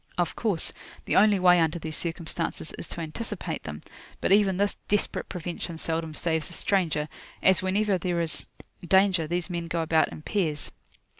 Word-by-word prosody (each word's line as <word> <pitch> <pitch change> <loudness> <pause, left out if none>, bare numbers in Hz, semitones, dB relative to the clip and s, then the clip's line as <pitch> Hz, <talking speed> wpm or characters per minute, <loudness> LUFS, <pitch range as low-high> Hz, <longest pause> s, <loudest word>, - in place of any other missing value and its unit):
Of 175 -1 0
course, 205 -8 -1 0.3
the - - 0
only 210 0 +6
way 180 -1 +6
under 160 0 +2
these 160 -1 -4
circumstances 165 -1 -3
is - - -8
to 170 - -4
anticipate 170 0 -4
them; 75 -1 -7 0.4
but - - 0
even 195 -2 +5
this 205 +1 +1
desperate 205 0 0
prevention 175 -1 -5
seldom 160 -1 -3
saves 160 -2 +1
a - - -9
stranger, 165 -6 +1 0.4
as 190 -1 +6
whenever 195 +1 +1
there 175 0 -1
is 165 -2 0 0.4
danger, 190 -2 +3
these 175 +1 -1
men 170 -2 -4
go 165 0 -1
about 160 0 +2
in 155 - -9
pairs. 155 -7 0
175 Hz, 170 wpm, -27 LUFS, 160-190 Hz, 0.4 s, only